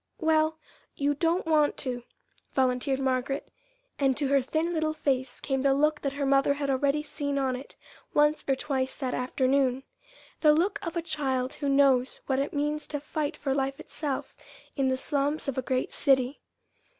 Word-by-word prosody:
"Well, 315 -1 +2 0.4
you 285 +1 +1
don't 335 +5 0
want 310 -2 +3
to," 245 -2 -2 0.5
volunteered 260 +1 +1
Margaret; 265 +1 -1 0.5
and 270 -2 +2
to 285 -2 0
her 280 -1 +4
thin 315 +6 -1
little 315 -1 0
face 265 -4 -1
came 270 -1 -1
the 270 0 +3
look 300 +1 +2
that 275 -1 -2
her 280 0 -2
mother 275 +1 +3
had 280 -1 -1
already 280 +3 +1
seen 285 -1 -3
on 265 -2 +1
it 260 +3 -9 0.4
once 295 +1 +3
or 270 - +4
twice 265 -1 -2
that 260 -3 -3
afternoon 260 +1 +1 0.6
the 300 -2 +6
look 390 +6 +1
of 335 -2 -4
a 335 - -1
child 270 -5 -1
who 285 - 0
knows 275 -2 +3
what 265 -1 0
it 280 - -1
means 295 0 -1
to 295 - -3
fight 300 +1 -3
for 270 -2 -1
life 270 0 -1
itself 290 -4 -4 0.4
in 275 -2 +1
the 260 0 +1
slums 285 +3 -1
of 275 - -1
a 260 - 0
great 255 0 -1
city. 265 -1 +2
280 Hz, 180 wpm, -28 LUFS, 265-300 Hz, 0.6 s, the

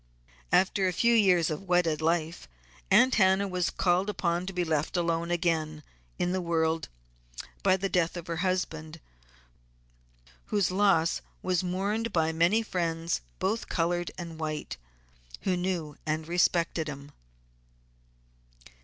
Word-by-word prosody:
After 190 0 +3
a 180 - 0
few 235 +7 +3
years 185 -8 +4
of 170 +6 -5
wedded 175 -3 +2
life, 165 +1 -1 0.4
Aunt 260 - +5
Hannah 190 0 +3
was 180 -2 -1
called 180 +2 +1
upon 175 -3 -1
to - - -3
be 180 -1 -1
left 160 +1 -1
alone 170 -1 0
again 160 -3 -1 0.3
in 175 - 0
the 185 0 -1
world 165 -1 0 0.7
by 190 -1 +3
the 195 +1 -1
death 175 -2 0
of 170 - -6
her 170 -1 -4
husband, 165 -3 -2 1.5
whose 200 -4 +1
loss 190 -4 +2 0.2
was 185 -1 +1
mourned 200 +5 -1
by 160 -2 +1
many 170 +8 +2
friends, 170 -4 -2 0.2
both 220 +4 -2
colored 175 +1 0
and 170 -2 -7
white, 155 -1 -4 0.7
who 185 - 0
knew 175 -5 -2
and 155 0 -1
respected 170 -2 +1
him. 140 0 -8
175 Hz, 135 wpm, -28 LUFS, 165-185 Hz, 1.5 s, Aunt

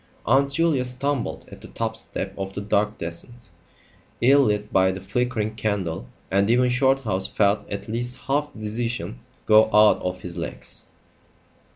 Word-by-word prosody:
Aunt 135 +4 +3
Julia 155 -3 +2
stumbled 125 +1 -2
at - - -11
the - - -10
top 110 -1 -3
step 95 -3 -5
of 95 0 -5
the 100 - -4
dark 105 +1 0
descent, 95 +7 -7 0.7
ill 135 +4 +6
lit 105 -1 -1
by 95 0 +4
the 95 - -5
flickering 110 +2 -1
candle, 95 - -2 0.2
and 100 +2 +2
even 125 +1 +4
Shorthouse 125 -6 +1
felt 100 0 +1
at 100 0 -5
least 120 +3 -3
half 145 +2 0
the 110 - -11
decision 115 - -3 0.3
go 110 0 +7
out 105 0 +5
of 90 0 -3
his 90 -1 -7
legs. 85 - -5
110 Hz, 160 wpm, -24 LUFS, 100-125 Hz, 0.7 s, go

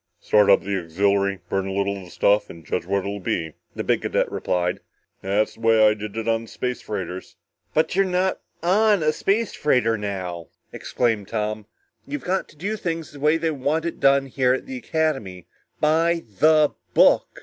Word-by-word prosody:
"Start 105 -1 +3
up 100 - +6
the 100 0 -1
auxiliary, 100 +2 0
burn 95 +1 -1
a - - -3
little 100 0 0
of 95 - -9
the - - -14
stuff 105 +3 +2
and 85 -2 -12
judge 85 - -3
what 100 +1 +1
it'll 100 +1 -4
be," 80 -4 -2 0.2
the - - -3
big - - +1
cadet - - 0
replied. 90 -1 -1 0.4
"That's 100 +3 0
the - - -20
way 110 -1 +5
I 105 - +4
did 105 0 -7
it 115 0 -3
on 115 0 +1
the 115 - -11
space 125 +2 -4
freighters." 95 -3 -6 0.4
"But 160 +2 +2
you're 195 - +4
not 185 0 0 0.2
on 205 +1 +3
a 155 0 +2
space 205 +6 0
freighter 120 -6 +1
now!" 90 -5 -5 0.3
exclaimed 115 -5 -1
Tom. 105 -1 -3 0.4
"You've 290 0 -5
got 190 +1 -1
to - - -18
do 205 +7 -3
things 165 -5 -4
the 145 - -12
way 150 +3 +3
they 165 0 -1
want 150 +3 -1
it 170 - -4
done 135 0 +4
here 130 -1 +1
at - - -7
the 265 -1 -6
Academy. 135 - -2 0.3
By 165 +2 +2 0.2
the 155 -1 +5 0.2
book! - - +4
115 Hz, 195 wpm, -23 LUFS, 100-160 Hz, 0.4 s, up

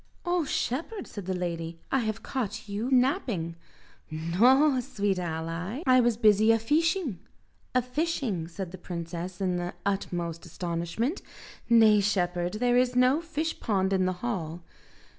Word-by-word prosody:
"Oh, 350 -2 +1
shepherd," 325 - -2
said 200 -4 -8
the 190 - -1
lady, 170 -2 -4
"I 270 - +3
have 220 -3 -3
caught 215 -4 -4
you 205 +5 -3
napping!" 245 - +1 0.5
"Noa, 245 - +3
sweet 205 -6 -1
ally, 170 - -4
I 255 0 +6
was 240 -2 +2
busy 215 -1 +5
a 225 - +5
feeshing." 300 - +1 0.6
"A 255 - +4
fishing," 250 - -2
said 175 +1 -6
the 185 - -9
princess 175 +1 -6
in 185 -2 0
the 175 0 -4
utmost 175 -4 -2
astonishment: 175 - -3 0.5
"Nay, 220 -3 +6
shepherd, 180 -3 0
there 245 +3 +2
is 250 0 +2
no 255 +5 +4
fish 325 -1 -3
pond 195 -3 +1
in 185 -1 +2
the 185 - 0
hall." 175 -7 -3
210 Hz, 145 wpm, -28 LUFS, 175-255 Hz, 0.6 s, I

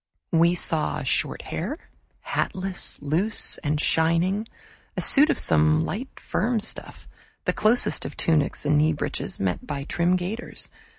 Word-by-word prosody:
We 170 +1 +3
saw 160 -3 +1
short - - -1
hair, 220 - -5 0.4
hatless, 190 -1 -2
loose, 175 +10 +1
and 150 -1 -2
shining; 170 +8 +1 0.5
a - - 0
suit 295 +3 +6
of - - +1
some 80 0 +3
light 255 +7 -6
firm 235 0 -1
stuff, 220 - -1 0.4
the - - +1
closest 220 +4 +3
of - - -7
tunics 150 -3 0
and 150 0 +3
kneebreeches, 150 -2 -2
met 95 -2 -2
by 145 -2 -4
trim 175 +5 0
gaiters. 190 +7 -5
170 Hz, 135 wpm, -24 LUFS, 150-210 Hz, 0.5 s, suit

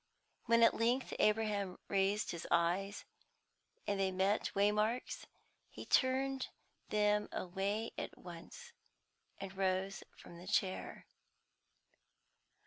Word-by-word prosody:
When 230 0 +5
at 230 - +7
length 240 +3 +1
Abraham 210 -3 +1
raised 200 +2 +1
his 170 -1 -6
eyes, 175 +4 +1 0.8
and 200 -1 -1
they 190 -1 +2
met 190 +3 +1
Waymark's, 210 +4 +1 0.4
he - - -9
turned 265 0 +2 0.4
them 210 0 +2
away 200 +5 -2
at - - -5
once, 185 - -10 0.7
and 195 -1 -7
rose 190 0 0
from 170 - -12
the 180 - -11
chair. 190 -1 -1
200 Hz, 105 wpm, -36 LUFS, 190-225 Hz, 0.8 s, at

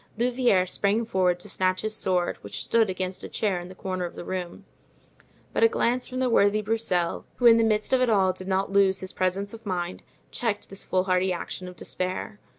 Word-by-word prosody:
Louvieres 240 -6 +2
sprang 210 +3 +1
forward 180 -4 +1
to - - -8
snatch 185 +1 0
his 215 0 -1
sword, 180 -4 0
which 100 - -6
stood 225 -3 +2
against 185 0 -3
a - - -6
chair 200 -4 0
in 175 +1 -9
a 185 - -11
corner 185 -1 -3
of 175 - -5
the - - -7
room; 180 -2 -5 0.9
but - - +2
a - - +9
glance 250 - 0
from 255 - -6
the 260 0 +1
worthy 215 -2 +3
Broussel, 200 -6 0
who 245 - -2
in 230 -1 +9
the 230 - +3
midst 215 +1 +1
of 260 - +4
it 250 - +3
all 190 -4 +3
did 185 - -8
not 195 0 0
lose 195 -1 +3
his 190 - -6
presence 190 +3 -1
of 225 0 -10
mind, 180 -3 -3 0.3
checked 220 -5 -3
this 195 - -3
foolhardy 185 0 +1
action 180 +1 -5
of 180 - -9
despair. 185 +4 -4
190 Hz, 215 wpm, -26 LUFS, 185-225 Hz, 0.9 s, a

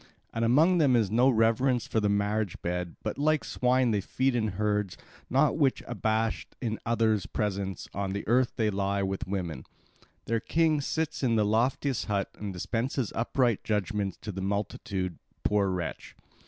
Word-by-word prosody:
And 115 - -1
among 155 +10 +4
them 140 -5 +4
is 110 -5 +2
no 125 +4 +5
reverence 120 +2 +2
for 110 - 0
the 105 -1 +1
marriage 100 -1 0
bed, 90 0 -2
but, - - -3
like 155 +1 +2
swine 125 -1 +2
that 100 -3 0
feed 130 +5 0
in 115 -3 +1
herds, 105 -3 0 0.3
no 135 +3 +4
whit 140 -4 +1
abashed 110 -1 -1
in 110 -3 -2
others' 110 -4 +2
presence, 100 -3 -3
on 100 0 -2
the 100 - -4
earth 120 +2 +3
they 110 -2 +1
lie 100 0 0
with 95 0 -2
the - - -6
women. 85 -9 -3 0.6
Their 115 0 0
king 155 +3 +2
sits 160 +3 -2
in 120 -4 +2
the 105 -1 +3
loftiest 120 +4 +1
hut 100 -2 -1
and 105 -1 -6
dispenses 115 +6 -2
upright 120 0 +1
judgments 105 -2 -1
to 105 - -4
the 95 0 -5
multitude, 95 -2 -3 0.2
poor 100 -2 +2
wretch! 90 -3 -4
110 Hz, 170 wpm, -28 LUFS, 100-125 Hz, 0.6 s, no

